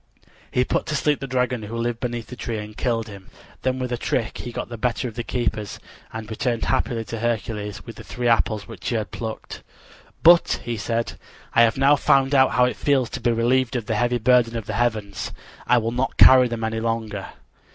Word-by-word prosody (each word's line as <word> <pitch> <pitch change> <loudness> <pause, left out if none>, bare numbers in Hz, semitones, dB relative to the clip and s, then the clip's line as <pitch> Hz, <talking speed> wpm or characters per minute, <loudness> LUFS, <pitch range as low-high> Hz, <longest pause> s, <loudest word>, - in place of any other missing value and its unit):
He 125 - +2
put - - -1
to 150 - -1
sleep 150 0 +1
the 135 - -5
dragon 125 -2 0
who 110 +2 -6
lived 115 0 -2
beneath 120 -3 -3
the 125 - -9
tree 115 -2 -4
and 105 0 -7
killed 115 -2 -1
him. 100 -3 -11 0.3
Then 130 0 0
with 125 -1 -3
a 120 - -1
trick 115 -1 -2
he 120 - -6
got - - -4
the 120 - -7
better 120 +2 -1
of 115 - -7
the 120 - -4
keepers, 110 -4 -3 0.3
and 110 -1 -6
returned 115 +1 -2
happily 120 -3 0
to 115 +2 -5
Hercules 110 -3 -3
with - - -10
the - - -9
three 120 0 -3
apples 110 -3 +1
which 115 -7 -6
he 120 - -1
had 110 -2 -2
plucked. 110 -1 -6 0.6
"But," 170 +1 +6
he 120 - -3
said, 115 +2 -3 0.3
"I 115 - +5
have 115 0 +4
now 140 +2 +5
found 135 +1 +3
out 130 -1 +5
how 125 - +4
it 125 - -2
feels 135 -4 +1
to - - -5
be 120 - +2
relieved 120 +2 +1
of 120 -3 -2
the 115 - -1
heavy 120 +3 +1
burden 120 0 +3
of 110 - -5
the - - -4
heavens. 110 -4 -1 0.4
I 125 - +5
will 115 -1 0
not 125 +2 -2
carry 130 -1 +8
them 115 -1 -4
any 110 0 -1
longer." 110 -3 -3
115 Hz, 225 wpm, -23 LUFS, 110-125 Hz, 0.6 s, carry